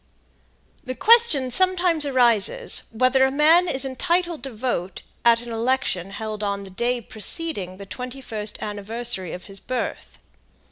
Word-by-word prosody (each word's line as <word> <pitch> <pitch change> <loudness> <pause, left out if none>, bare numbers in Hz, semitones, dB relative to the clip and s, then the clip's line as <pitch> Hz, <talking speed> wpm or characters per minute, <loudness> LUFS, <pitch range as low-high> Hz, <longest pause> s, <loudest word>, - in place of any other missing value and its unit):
The 255 -2 -5
question 440 - +4
sometimes 355 -2 +2
arises 255 - +3
whether 255 +3 +3
it - - -3
man 320 +5 +5
is 270 -4 +2
entitled 340 +4 -1
to 270 +1 -6
vote 215 -6 -3 0.2
at 235 -1 +4
an 240 -1 -8
election 230 -5 -1
held 215 +1 -5
on 200 -1 -2
the 195 - -11
day 240 +5 -1
preceding 215 - -4
the 200 - -9
twenty 250 +6 -7
first 215 -5 -5
anniversary 210 -2 -3
of 180 - -7
his 195 -1 -7
birth. 255 +4 -5
245 Hz, 145 wpm, -23 LUFS, 210-285 Hz, 0.2 s, man